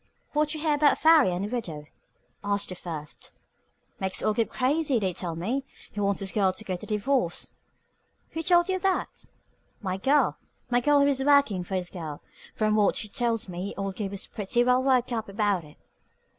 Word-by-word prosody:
"What 300 Hz, +1 st, +1 dB
you 310 Hz, -, -5 dB
hear 310 Hz, -1 st, +2 dB
about 290 Hz, -1 st, +4 dB
Farry 315 Hz, -, +6 dB
and 180 Hz, +3 st, -2 dB
the -, -, -5 dB
widow?" 160 Hz, -11 st, -5 dB, 0.6 s
asked 205 Hz, 0 st, -1 dB
the 185 Hz, -, -5 dB
first. 155 Hz, -4 st, -7 dB, 0.7 s
"Makes 190 Hz, -1 st, -1 dB
old 215 Hz, -, +1 dB
Gabe 230 Hz, -, +1 dB
crazy, 280 Hz, +1 st, +1 dB
they 190 Hz, -4 st, 0 dB
tell 170 Hz, -1 st, -4 dB
me. 230 Hz, +12 st, -2 dB, 0.3 s
He 210 Hz, -, -6 dB
wants 200 Hz, -1 st, 0 dB
his 195 Hz, -1 st, -2 dB
girl 195 Hz, -3 st, +2 dB
to 220 Hz, -, -6 dB
get 185 Hz, -4 st, -4 dB
a -, -, -8 dB
divorce." 215 Hz, -3 st, -1 dB, 0.8 s
"Who 325 Hz, -, -3 dB
told 345 Hz, 0 st, +4 dB
you 375 Hz, -1 st, 0 dB
that?" 380 Hz, 0 st, -1 dB, 0.5 s
"My 190 Hz, -3 st, -3 dB
girl. 280 Hz, +9 st, +2 dB, 0.3 s
My 245 Hz, 0 st, +3 dB
girl 290 Hz, +2 st, +4 dB
is 280 Hz, -1 st, +2 dB
workin' 280 Hz, -10 st, +4 dB
for 190 Hz, +2 st, -4 dB
his 180 Hz, -2 st, -2 dB
girl. 160 Hz, -5 st, -7 dB, 0.3 s
Fr'm 215 Hz, -1 st, +1 dB
what 210 Hz, -2 st, +3 dB
she 210 Hz, -, -3 dB
tells 230 Hz, -2 st, -1 dB
me 185 Hz, +2 st, -5 dB
old 195 Hz, -1 st, -3 dB
Gabe 200 Hz, -1 st, -4 dB
is 200 Hz, -, -4 dB
pretty 225 Hz, +4 st, 0 dB
well 250 Hz, +1 st, +3 dB
worked 255 Hz, -2 st, +2 dB
up 220 Hz, -3 st, -3 dB
about 200 Hz, -3 st, 0 dB
it. 150 Hz, -1 st, -16 dB
215 Hz, 195 wpm, -27 LUFS, 190-275 Hz, 0.8 s, Farry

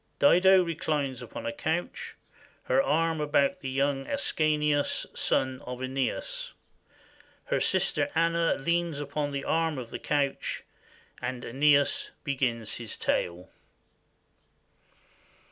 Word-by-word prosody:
Dido 190 Hz, -6 st, +6 dB
reclines 150 Hz, -6 st, -2 dB
upon 120 Hz, -, -7 dB
a 115 Hz, -, -2 dB
couch, 315 Hz, -, -3 dB, 0.5 s
her 270 Hz, -, +3 dB
arm 165 Hz, -, +1 dB
about 150 Hz, +4 st, +2 dB
the 135 Hz, -, -5 dB
young 135 Hz, 0 st, 0 dB
Ascanius, 150 Hz, -1 st, +1 dB
son 130 Hz, -1 st, 0 dB
of 125 Hz, 0 st, -6 dB
/Eneas. 135 Hz, -, -3 dB, 0.9 s
Her -, -, 0 dB
sister 285 Hz, -, +1 dB
Anna 165 Hz, 0 st, +2 dB
leans 170 Hz, +1 st, 0 dB
upon 145 Hz, 0 st, -2 dB
the 140 Hz, -1 st, -3 dB
arm 165 Hz, -2 st, +1 dB
of 120 Hz, -3 st, -6 dB
the -, -, -5 dB
couch, 140 Hz, -2 st, -1 dB, 0.6 s
and 125 Hz, 0 st, -4 dB
/Eneas 140 Hz, +3 st, +3 dB
begins 125 Hz, -6 st, -1 dB
his 115 Hz, -3 st, -5 dB
tale. 90 Hz, +1 st, -1 dB
145 Hz, 110 wpm, -28 LUFS, 130-165 Hz, 0.9 s, Dido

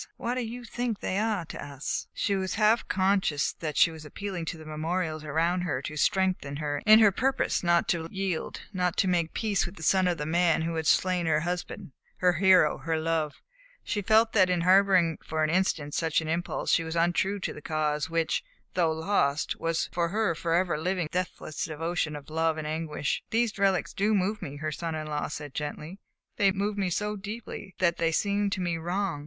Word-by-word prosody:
What 235 Hz, -, -2 dB
do 255 Hz, -, -1 dB
you 240 Hz, +2 st, -6 dB
think 240 Hz, -2 st, -3 dB
they 190 Hz, -, -1 dB
are 215 Hz, -5 st, 0 dB
to -, -, -7 dB
us?" 140 Hz, -1 st, -4 dB
She 200 Hz, -, 0 dB
was 190 Hz, -1 st, -2 dB
half 215 Hz, +2 st, +3 dB
conscious 190 Hz, -6 st, +1 dB
that 155 Hz, -2 st, -4 dB
she 165 Hz, -, +6 dB
was 160 Hz, -1 st, -10 dB
appealing 180 Hz, +2 st, -5 dB
to 165 Hz, -, -4 dB
the 155 Hz, -, -11 dB
memorials 155 Hz, +1 st, -2 dB
around 165 Hz, +4 st, 0 dB
her 170 Hz, -7 st, -1 dB
to 150 Hz, -, -5 dB
strengthen 185 Hz, -3 st, +1 dB
her 145 Hz, -1 st, -2 dB
in 215 Hz, 0 st, +10 dB
her 215 Hz, -2 st, +6 dB
purpose 260 Hz, +7 st, 0 dB
not 170 Hz, -1 st, +3 dB
to 165 Hz, -2 st, 0 dB
yield, 190 Hz, -3 st, -3 dB
not 180 Hz, -2 st, 0 dB
to 195 Hz, -, +3 dB
make 170 Hz, -3 st, 0 dB
peace 210 Hz, -4 st, +1 dB
with 175 Hz, -, -10 dB
the 160 Hz, -, -10 dB
son 185 Hz, +2 st, +3 dB
of 175 Hz, -1 st, 0 dB
the 150 Hz, -, -3 dB
man 165 Hz, 0 st, +2 dB
who 165 Hz, +1 st, -2 dB
had 160 Hz, -1 st, -2 dB
slain 180 Hz, -2 st, +2 dB
her 155 Hz, -1 st, +2 dB
husband, 175 Hz, -3 st, -4 dB, 0.3 s
her 180 Hz, -1 st, +3 dB
hero, 185 Hz, -2 st, +4 dB
her 160 Hz, 0 st, -1 dB
love; 160 Hz, -2 st, -2 dB, 0.4 s
she 205 Hz, -, -2 dB
felt 220 Hz, +3 st, +4 dB
that 190 Hz, -4 st, +5 dB
in 180 Hz, -2 st, +1 dB
harboring 185 Hz, -2 st, +4 dB
for 155 Hz, 0 st, -1 dB
an 155 Hz, -, +1 dB
instant 165 Hz, -5 st, 0 dB
such 160 Hz, -1 st, +1 dB
an 160 Hz, -, -5 dB
impulse 170 Hz, +2 st, -1 dB
she 165 Hz, -, +3 dB
was 160 Hz, 0 st, -5 dB
untrue 175 Hz, +4 st, +1 dB
to -, -, -3 dB
the 150 Hz, -, -10 dB
Cause 150 Hz, -1 st, -1 dB
which, 165 Hz, -1 st, 0 dB, 0.3 s
though 170 Hz, -3 st, +2 dB
lost, 160 Hz, -3 st, 0 dB
was 165 Hz, 0 st, 0 dB
for 170 Hz, -1 st, 0 dB
her 210 Hz, -1 st, +1 dB
forever 170 Hz, 0 st, 0 dB
living 180 Hz, +1 st, -1 dB
with 155 Hz, -, -10 dB
the 180 Hz, -, +1 dB
deathless 180 Hz, -4 st, -4 dB
devotion 160 Hz, 0 st, -2 dB
of 145 Hz, +1 st, -10 dB
love 160 Hz, 0 st, +1 dB
and 155 Hz, -, -4 dB
anguish. 155 Hz, -1 st, -2 dB
"These 225 Hz, -2 st, 0 dB
relics 195 Hz, -2 st, +1 dB
do 210 Hz, +2 st, +1 dB
move 205 Hz, +2 st, 0 dB
me," 140 Hz, -, -6 dB
her 155 Hz, +1 st, -3 dB
son 165 Hz, +1 st, -4 dB
in 155 Hz, 0 st, -4 dB
law 150 Hz, -1 st, -2 dB
said 150 Hz, -2 st, -7 dB
gently. 150 Hz, +5 st, -5 dB, 0.4 s
"They 200 Hz, -1 st, +4 dB
move 200 Hz, +2 st, -2 dB
me 195 Hz, -3 st, 0 dB
so 210 Hz, +4 st, -1 dB
deeply 205 Hz, -1 st, -7 dB
that 170 Hz, -2 st, +2 dB
they 165 Hz, -1 st, +1 dB
seem 200 Hz, +4 st, +1 dB
to 195 Hz, -1 st, -2 dB
me 175 Hz, -2 st, -1 dB
wrong. 180 Hz, -1 st, -2 dB
175 Hz, 215 wpm, -28 LUFS, 160-195 Hz, 0.4 s, in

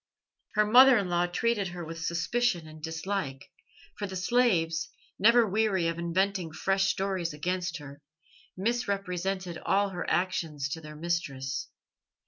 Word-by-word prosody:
Her 210 Hz, 0 st, +4 dB
mother 255 Hz, +4 st, +8 dB
in 195 Hz, -3 st, -1 dB
law 175 Hz, 0 st, +2 dB
treated 205 Hz, +2 st, 0 dB
her 175 Hz, -1 st, -6 dB
with 165 Hz, +1 st, -7 dB
suspicion 170 Hz, +2 st, 0 dB
and 155 Hz, 0 st, -12 dB
dislike, 160 Hz, -3 st, -4 dB, 0.5 s
for 205 Hz, -, -2 dB
the 190 Hz, -, -7 dB
slaves, 185 Hz, -6 st, +1 dB, 0.3 s
never 235 Hz, +3 st, +6 dB
weary 195 Hz, -4 st, +1 dB
of 165 Hz, 0 st, -2 dB
inventing 175 Hz, 0 st, 0 dB
fresh 195 Hz, +2 st, +1 dB
stories 190 Hz, -4 st, -1 dB
against 180 Hz, +3 st, -2 dB
her, 145 Hz, -1 st, -11 dB, 0.6 s
misrepresented 195 Hz, -4 st, -2 dB
all 200 Hz, +1 st, +1 dB
her 180 Hz, -2 st, -4 dB
actions 160 Hz, -6 st, -1 dB
to 160 Hz, +3 st, -5 dB
their 150 Hz, -1 st, -10 dB
mistress. 140 Hz, -5 st, -3 dB
180 Hz, 135 wpm, -29 LUFS, 165-200 Hz, 0.6 s, mother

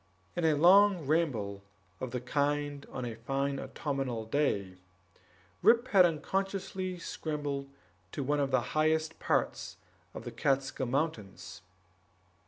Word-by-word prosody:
In 175 Hz, -, 0 dB
a 155 Hz, -2 st, +4 dB
long 185 Hz, +2 st, +6 dB
ramble 125 Hz, -11 st, 0 dB, 0.4 s
of 130 Hz, -, -4 dB
the 125 Hz, +1 st, -3 dB
kind 145 Hz, +2 st, -1 dB
on 130 Hz, -2 st, -4 dB
a 120 Hz, -, -4 dB
fine 135 Hz, +3 st, -1 dB
autumnal 135 Hz, -6 st, -3 dB
day, 100 Hz, -8 st, -1 dB, 0.8 s
Rip 240 Hz, +2 st, +5 dB
had 185 Hz, -3 st, +7 dB
unconsciously 185 Hz, +2 st, -2 dB
scrambled 145 Hz, -4 st, -4 dB, 0.4 s
to 140 Hz, -, -3 dB
one 145 Hz, +2 st, +1 dB
of 140 Hz, -1 st, +1 dB
the 130 Hz, -2 st, +3 dB
highest 155 Hz, +1 st, +1 dB
parts -, -, -1 dB, 0.4 s
of -, -, -6 dB
the -, -, -6 dB
Kaatskill 135 Hz, -2 st, 0 dB
Mountains. 135 Hz, -8 st, -3 dB
145 Hz, 125 wpm, -31 LUFS, 130-160 Hz, 0.8 s, had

